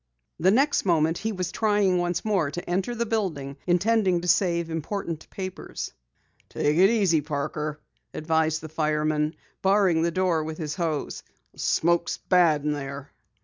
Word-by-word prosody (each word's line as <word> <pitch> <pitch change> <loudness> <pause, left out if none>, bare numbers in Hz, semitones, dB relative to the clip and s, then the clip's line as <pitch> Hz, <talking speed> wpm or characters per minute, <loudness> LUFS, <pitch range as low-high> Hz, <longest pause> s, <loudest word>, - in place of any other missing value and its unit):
The 180 +3 +4
next 275 +8 +3
moment 165 -2 +2
he 220 +2 -2
was 185 -3 -3
trying 205 -4 +2
once 175 +1 -1
more 195 -9 +1
to 175 +4 -6
enter 190 +7 -1
the 235 0 -1
building, 170 -12 -2
intending 185 0 +2
to 180 - -5
save 170 -3 +2
important 165 0 -4
papers. 185 - -6 0.6
"Take 150 +1 0
it 190 +2 +6
easy, 195 -9 +3
Parker," 150 +1 -3 0.3
advised 160 0 0
the 160 - -8
fireman, 155 0 0 0.3
barring 190 -4 +3
the 170 - +2
door 170 -2 +1
with 155 0 -5
his 155 -3 -4
hose. 160 -5 -3 0.3
"The - - -19
smoke's 170 +1 +1
bad 170 -5 +3
in 150 - +1
there." 140 0 -6
170 Hz, 155 wpm, -25 LUFS, 155-190 Hz, 0.6 s, it